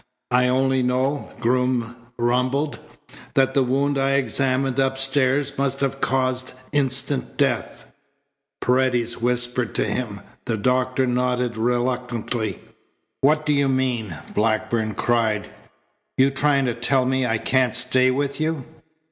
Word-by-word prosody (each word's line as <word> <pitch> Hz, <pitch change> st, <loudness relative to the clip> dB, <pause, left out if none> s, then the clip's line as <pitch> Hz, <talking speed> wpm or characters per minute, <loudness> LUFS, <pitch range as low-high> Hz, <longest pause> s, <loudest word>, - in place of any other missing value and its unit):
"I 125 Hz, 0 st, +4 dB
only 130 Hz, +1 st, +2 dB
know," 130 Hz, +3 st, 0 dB
Groom 125 Hz, -1 st, 0 dB, 0.2 s
rumbled, 125 Hz, +5 st, 0 dB, 0.6 s
"that 135 Hz, -1 st, +3 dB
the 135 Hz, -, +3 dB
wound 135 Hz, +2 st, +1 dB
I 135 Hz, 0 st, +2 dB
examined 135 Hz, -1 st, 0 dB
upstairs 135 Hz, +1 st, +1 dB
must 135 Hz, 0 st, 0 dB
have 135 Hz, 0 st, -1 dB
caused 130 Hz, 0 st, 0 dB, 0.2 s
instant 135 Hz, -1 st, 0 dB
death." -, -, -1 dB, 0.8 s
Paredes 125 Hz, -2 st, +1 dB
whispered 120 Hz, 0 st, 0 dB
to -, -, +2 dB
him. 105 Hz, -5 st, -3 dB, 0.2 s
The 115 Hz, -3 st, -1 dB
doctor 130 Hz, +3 st, +1 dB
nodded 125 Hz, -1 st, 0 dB
reluctantly. 120 Hz, -2 st, -2 dB, 0.6 s
"What 150 Hz, +2 st, +2 dB
do 150 Hz, -, +2 dB
you 140 Hz, -1 st, +2 dB
mean?" 125 Hz, -, -1 dB, 0.2 s
Blackburn 110 Hz, 0 st, 0 dB
cried. 110 Hz, -3 st, 0 dB, 0.7 s
"You 135 Hz, +1 st, +4 dB
trying 140 Hz, 0 st, +2 dB
to 120 Hz, -, 0 dB
tell 125 Hz, +3 st, +1 dB
me 130 Hz, 0 st, +1 dB
I 115 Hz, -1 st, +1 dB
can't 130 Hz, +2 st, +1 dB
stay 130 Hz, +1 st, +3 dB
with 140 Hz, +2 st, -1 dB
you?" 155 Hz, -4 st, -1 dB
130 Hz, 125 wpm, -22 LUFS, 120-135 Hz, 0.8 s, I